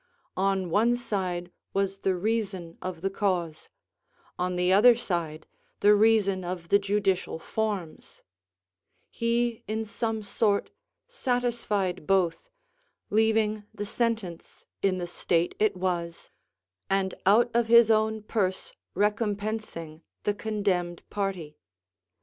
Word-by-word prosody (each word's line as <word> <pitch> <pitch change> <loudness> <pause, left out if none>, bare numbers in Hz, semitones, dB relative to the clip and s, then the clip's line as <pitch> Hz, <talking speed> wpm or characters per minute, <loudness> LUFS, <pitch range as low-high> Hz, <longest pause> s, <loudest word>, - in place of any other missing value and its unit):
On 190 -2 0
one 230 +6 +3
side 185 -7 -3 0.2
was 195 0 0
the 190 -1 +1
reason 195 -4 -2
of 180 -3 -5
the 195 +1 -1
cause; 180 -6 -2 0.7
on 180 0 -1
the 180 +1 +2
other 235 +5 +7
side, 165 -8 -3 0.4
the 205 +1 +7
reason 205 -3 +3
of 175 -1 -5
the 200 - +5
judicial 200 -3 0
forms: 200 -2 -4 0.9
he 235 0 0
in 220 +1 -2
some 220 0 -3
sort 205 0 0 0.4
satisfied 240 - -1
both, 190 - +1 0.6
leaving 215 0 +2
the 205 - -4
sentence 220 -6 -3 0.2
in 190 -2 +2
the 175 - -3
state 170 0 0
it 210 -3 +2
was, 175 -2 -3 0.6
and 195 -1 +1
out 235 +4 +5
of 235 -1 +2
his 235 -1 +7
own 220 0 +1
purse 190 -4 -1 0.2
recompensing 205 -6 -2 0.2
the 205 - +1
condemned 200 -5 -2
party. 185 -7 -3
200 Hz, 115 wpm, -27 LUFS, 180-220 Hz, 0.9 s, other